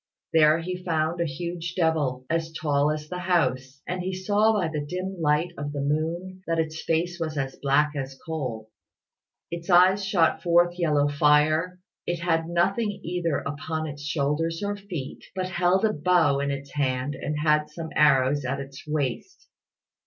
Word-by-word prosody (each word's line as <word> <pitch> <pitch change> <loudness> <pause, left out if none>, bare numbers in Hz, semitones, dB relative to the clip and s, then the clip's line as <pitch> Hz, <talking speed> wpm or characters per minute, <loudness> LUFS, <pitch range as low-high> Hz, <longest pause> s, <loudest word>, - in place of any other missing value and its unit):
There 155 0 +5
he 180 +1 -5
found 165 0 0
a - - +2
huge 170 +3 -5
devil, 150 -7 0
as 165 +1 -1
tall 145 -2 +1
as 150 0 -3
the 180 +2 -5
house, 140 -7 0
and 180 0 -2
he 185 +1 -3
saw 205 +3 +2
by 195 -6 +1
the 155 -2 -3
dim 185 +4 -5
light 150 +3 +2
of 145 0 -4
the 145 - -2
moon 165 +6 -2
that 165 0 0
its 160 0 -2
face 170 +2 -1
was 155 -2 -3
as 135 -1 -2
black 145 +2 +3
as 135 -1 -5
coal. 125 -9 -4 0.8
Its 170 +1 -6
eyes 185 +3 +6
shot 190 -4 +2
forth 175 0 +3
yellow 150 -4 +2
fire: 150 +4 +3 0.3
it 175 - 0
had 165 -1 0
nothing 195 +5 0
either 170 -3 -1
upon 155 +3 -3
its 145 -1 -7
shoulders 150 +4 -1
or 205 0 -1
feet; 185 -9 -7
but 185 -1 -2
held 185 +2 +2
a 215 - +2
bow 155 -3 +3
in 140 0 -1
its 140 0 -5
hand 130 -1 -1
and 150 +2 -4
had 150 0 +2
some 160 +1 -7
arrows 140 -1 +4
at 135 +2 -2
its 135 0 -8
waist. 150 - -3
160 Hz, 175 wpm, -26 LUFS, 145-175 Hz, 0.8 s, eyes